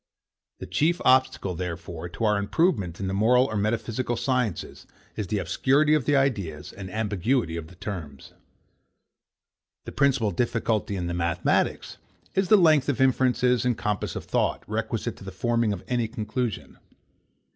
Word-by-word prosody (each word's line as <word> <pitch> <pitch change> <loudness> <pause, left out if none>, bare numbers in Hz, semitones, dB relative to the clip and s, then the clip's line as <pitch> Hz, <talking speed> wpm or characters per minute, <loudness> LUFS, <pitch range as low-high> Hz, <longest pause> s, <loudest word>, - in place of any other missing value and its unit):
The - - -7
chief 170 +4 +1
obstacle, 130 -7 +3
therefore, 85 -1 -5
to 115 - -6
our 105 -1 +3
improvement 100 - 0
in 100 - -3
the 95 - -2
moral 120 +6 +4
or 110 - -4
metaphysical 115 +3 -1
sciences 125 - -2 0.3
is 105 - -3
the 105 - -1
obscurity 145 +8 +2
of 150 -5 +2
the 145 - +3
ideas, 100 - -1
and 95 -1 -8
ambiguity 105 -1 0
of 85 -2 -5
the 95 - -15
terms. 85 -8 -7 1.5
The - - -6
principal 135 -7 +2
difficulty 110 0 -1
in 90 -2 -3
the 85 - -3
mathematics 85 0 0 0.4
is 190 0 +1
the 215 - +7
length 155 -7 +4
of 135 - -1
inferences 125 -1 +3
and 125 -2 +1
compass 105 -2 -2
of - - -5
thought, - - 0
requisite - - -3
to - - -12
the 95 - -7
forming 115 +3 0
of 100 -3 -5
any 120 -2 0
conclusion. 110 +2 -4
110 Hz, 155 wpm, -26 LUFS, 95-130 Hz, 1.5 s, the